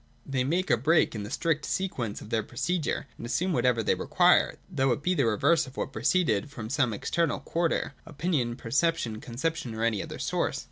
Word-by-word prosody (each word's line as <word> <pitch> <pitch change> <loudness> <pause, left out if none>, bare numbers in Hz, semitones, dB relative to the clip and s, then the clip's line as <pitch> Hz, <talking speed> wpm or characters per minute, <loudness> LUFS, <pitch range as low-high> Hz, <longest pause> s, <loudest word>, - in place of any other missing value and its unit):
They 135 -2 0
make 175 +8 0
a - - +5
break 160 +8 +3
in 110 - -4
the 100 - -6
strict 155 +2 0
sequence 125 - -2
of 105 - -11
their 115 - +2
procedure, 160 - -2
and - - -7
assume 175 +10 0
whatever 120 -4 +2
they - - +3
require, - - +3
though 135 0 +1
it 145 - -6
be 180 - +2
the 140 -9 +2
reverse 145 +9 +3
of 130 - -13
what - - -3
preceded, 150 - +1
from 115 -5 -7
some 135 -4 +2
external 165 +10 0
quarter, 165 -4 -1
— - - -31
opinion, 150 -7 -1
perception, 125 -3 0
conception 130 0 -3
or 110 - -2
any 110 -4 +1
other - - -7
source. - - -1
135 Hz, 200 wpm, -28 LUFS, 115-165 Hz, -, a